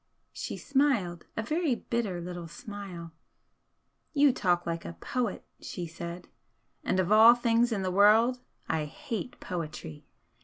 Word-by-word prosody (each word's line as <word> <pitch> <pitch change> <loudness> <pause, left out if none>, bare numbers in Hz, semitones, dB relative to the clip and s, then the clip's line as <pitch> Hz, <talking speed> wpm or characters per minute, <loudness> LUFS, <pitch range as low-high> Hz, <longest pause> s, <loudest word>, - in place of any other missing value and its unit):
She - - -5
smiled, 255 - +1
a 225 - 0
very 305 +1 +1
bitter 225 -7 -2
little 175 -1 -6
smile. 180 -2 -8 1.0
"You 285 -3 +5
talk 175 -7 +1
like 165 0 -3
a - - -6
poet," 235 +4 -3
she 175 - -5
said 170 +2 -7 0.6
"And 185 - +1
of 185 +1 +1
all 225 +3 +9
things 235 0 +2
in 200 -4 -1
the 185 - -1
world 220 +6 +5 0.3
I 160 -2 0
hate 225 - -6
poetry! 155 - -6
200 Hz, 140 wpm, -29 LUFS, 175-235 Hz, 1.0 s, all